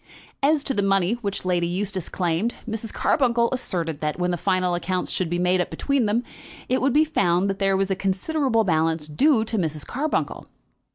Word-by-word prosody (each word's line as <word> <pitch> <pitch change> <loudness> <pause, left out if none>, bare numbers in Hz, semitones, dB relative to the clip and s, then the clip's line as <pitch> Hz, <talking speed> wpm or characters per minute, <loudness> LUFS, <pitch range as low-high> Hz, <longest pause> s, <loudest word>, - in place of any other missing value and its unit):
As 290 +1 +3
to 275 - 0
the 205 - +1
money 195 0 +2
which 200 -3 -3
Lady 175 -2 +1
Eustace 185 0 -2
claimed, 180 +6 -1
Mrs. 225 0 -3
Carbuncle 235 -4 +2
asserted 170 - -2
that, 150 -1 -1
when 180 0 0
the - - 0
final 185 0 0
accounts 180 +1 -2
should 180 -3 -1
be 175 - -1
made 180 +1 +2
up - - -3
between 275 -5 0
them, 225 +4 +1 0.4
it 255 - +1
would 270 +2 +2
be 305 +4 +4
found 180 - +1
that 195 - -6
there 195 -1 +2
was 195 0 0
a - - +2
considerable 225 +6 0
balance 160 -3 +1
due 225 - +3
to 220 -1 -2
Mrs. 155 -4 -2
Carbuncle. 295 +5 -2
195 Hz, 195 wpm, -24 LUFS, 175-235 Hz, 0.4 s, be